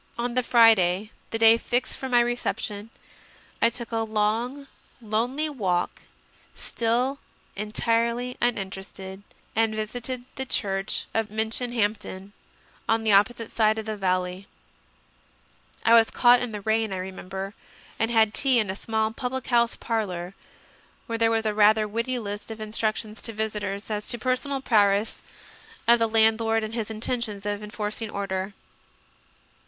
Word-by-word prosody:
On 240 +1 -2
the 255 - +2
Friday, 220 -4 +4 0.2
the 225 - -2
day 225 0 +7
fixed 245 +2 0
for 265 - -5
my 245 -1 +5
reception, 230 -3 -2 0.7
I 230 - +5
took 235 0 -6
a 225 - -1
long, 225 +5 -1 0.3
lonely 240 +7 -1
walk, 190 -12 -1 0.5
still 245 +4 0 0.4
entirely 230 +4 0
uninterested, 195 -4 -3 0.3
and 220 -1 +2
visited 245 +3 -4
the 265 - -2
church 195 -3 -1
of 225 -1 0
Minchinhampton, 220 -3 -2 0.6
on 225 0 +2
the 220 - +3
opposite 225 +3 +3
side 220 -1 +2
of 220 - -4
the 215 -1 -3
valley. 185 -1 -1 1.4
I 230 - +6
was 225 -1 +6
caught 245 0 +5
in 245 -2 -3
the 210 -1 -5
rain, 220 0 +1
I 190 - -2
remember, 190 +1 -6 0.5
and 225 - +1
had 220 -2 +3
tea 265 -3 +3
in 215 -4 +2
a - - -6
small 220 +1 -1
public 255 +2 -4
house 235 -1 +3
parlour, 190 -6 -3 0.7
where 230 -1 -3
there 225 0 +4
was 225 -1 0
a 215 - +1
rather 215 +1 +4
witty 230 +4 -2
list 205 -2 -6
of 225 0 -7
in 215 -1 -6
structions 215 0 -2
to 230 - -5
visitors 210 -1 -3
as 210 0 -3
to - - +1
the - - -14
personal 265 +2 0
prowess 205 -3 +2 0.7
of 235 0 +6
the 225 -1 +2
landlord 225 0 +3
and 215 +1 -5
his 225 -2 -3
intentions 220 -2 -3
of 205 0 -2
enforcing 210 +1 -4
order. 195 -1 -3
220 Hz, 150 wpm, -25 LUFS, 205-235 Hz, 1.4 s, day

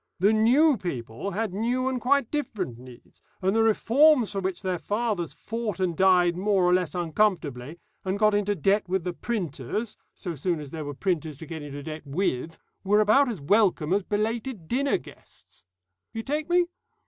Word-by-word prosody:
The 200 +4 +3
new 255 +7 +4
people 130 - -5
had 205 0 -2
new 245 +5 0
and 260 -2 -1
quite 275 -1 +2
different 195 - -3
needs, 125 -1 -15 0.2
and 190 +2 +1
the 225 - +4
reforms 240 +3 +4
for 200 - -2
which 190 +1 -3
their 185 -2 -1
fathers 210 -5 -2
fought 225 -2 -4
and 180 -3 0
died 180 -1 +4
more 195 0 +1
or 180 0 +4
less 180 -4 0
uncomfortably, 165 -6 -1 0.3
and 190 0 -1
got 215 0 +3
into 205 0 +1
debt 195 +3 +1
with 190 -1 0
the 180 0 -3
printers, 205 - -4 0.2
so 175 -4 -5
soon 165 +3 -1
as 145 -2 -8
there 160 -2 -5
were 145 -1 -5
printers 160 -3 -2
to 160 - -9
get 160 -1 -7
into 145 -1 -7
debt 155 +1 -6
with, 155 0 -2 0.3
were 205 +2 +3
about 230 +6 +4
as 220 -7 -4
welcome 180 -1 +2
as 200 - +2
belated 215 -1 -3
dinner 275 - +1
guests. 105 - -17 0.5
You 225 - -4
take 300 +5 -2
me? 350 0 +4
195 Hz, 185 wpm, -26 LUFS, 165-225 Hz, 0.5 s, new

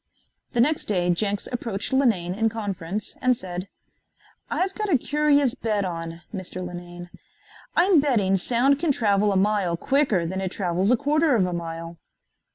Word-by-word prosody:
The 240 - 0
next 300 +5 +1
day 180 -4 0
Jenks 200 +3 -1
approached 235 -1 -3
Linane 220 -10 +2
in 225 +3 +1
conference 205 -3 -4
and 255 -1 +3
said: 180 -1 -6 0.8
"I've 380 +1 -1
got 425 -1 -3
a 290 - +5
curious 290 -1 +2
bet 210 -3 -1
on, 165 -1 -5
Mr. 185 -2 -6
Linane. 175 0 -9 0.6
I 345 - +5
am 375 -5 +5
betting 225 -10 +2
sound 250 +8 +2
can 330 -2 +2
travel 205 -4 +2
a 195 - +1
mile 195 -3 +1
quicker 265 - +1
than 190 +3 -3
it 190 -1 -3
travels 185 0 0
a 250 - +4
quarter 300 +2 +2
of 195 -5 +3
a 180 - -3
mile." 165 0 -6
205 Hz, 165 wpm, -24 LUFS, 180-260 Hz, 0.8 s, a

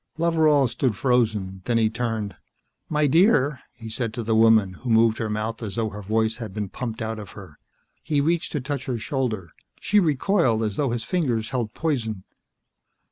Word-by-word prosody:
Loveral 160 -4 +3
stood 125 -2 -1
frozen, 110 -7 0
then 120 -1 +1
he 110 -1 +3
turned. 110 -3 -3 0.5
"My 150 -1 +2
dear," 150 - +4
he 115 - -10
said 110 0 -3
to 120 - -3
the 110 0 0
woman 110 -4 +5
who 125 - -4
moved 115 0 +4
her 110 - -2
mouth 110 +2 -3
as 105 -4 -5
though 115 -2 -1
her 105 0 -8
voice 110 +2 0
had 110 -5 -7
been 105 -3 -3
pumped 115 -1 -5
out 110 0 -4
of 105 -4 -10
her. - - -12 0.4
He 150 -2 0
reached 165 +4 0
to 150 - -1
touch 140 0 -4
her 125 -2 -1
shoulder. 110 - -3 0.3
She 210 - +3
recoiled, 150 - +2
as 105 -2 -2
though 140 +1 0
his 120 -1 -2
fingers 120 -11 -1
held 120 -4 -2
poison. 115 -11 -2
115 Hz, 190 wpm, -24 LUFS, 110-140 Hz, 0.5 s, woman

